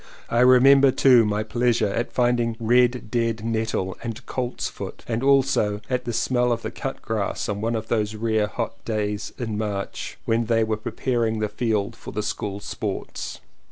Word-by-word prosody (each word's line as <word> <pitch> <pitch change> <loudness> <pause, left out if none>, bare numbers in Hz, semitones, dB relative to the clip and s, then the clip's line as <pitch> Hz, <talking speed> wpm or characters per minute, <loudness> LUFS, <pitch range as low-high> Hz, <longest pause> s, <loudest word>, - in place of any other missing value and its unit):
I 120 - +2
remember 135 +2 +7
too 130 -3 +5
my 105 0 0
pleasure 120 -1 +1
at 115 +4 -2
finding 120 -2 +1
red 120 0 +2
dead 115 -2 0
nettle 110 -5 -1
and 115 +2 -6
colt's 125 -1 -3
foot, - - -8
and 115 0 -1
also 135 -6 +3
at 125 -1 0
the 120 - -2
smell 125 +1 +1
of 115 -1 -1
the 110 - -4
cut 135 - -5
grass 110 -3 -2
on 105 -1 -3
one 115 +1 0
of 110 0 -4
those 110 -2 0
rare 110 -1 +1
hot 115 +1 -5
days 105 -2 -2
in 110 -4 -3
March 100 -2 -4
when 115 0 +1
they 115 -1 +3
were 110 -1 -1
pre 110 - -5
paring 115 -4 0
the 105 -1 -1
field 105 -2 -1
for - - -9
the 105 0 -3
School 100 -1 -3
Sports. - - -5
115 Hz, 185 wpm, -24 LUFS, 105-120 Hz, -, remember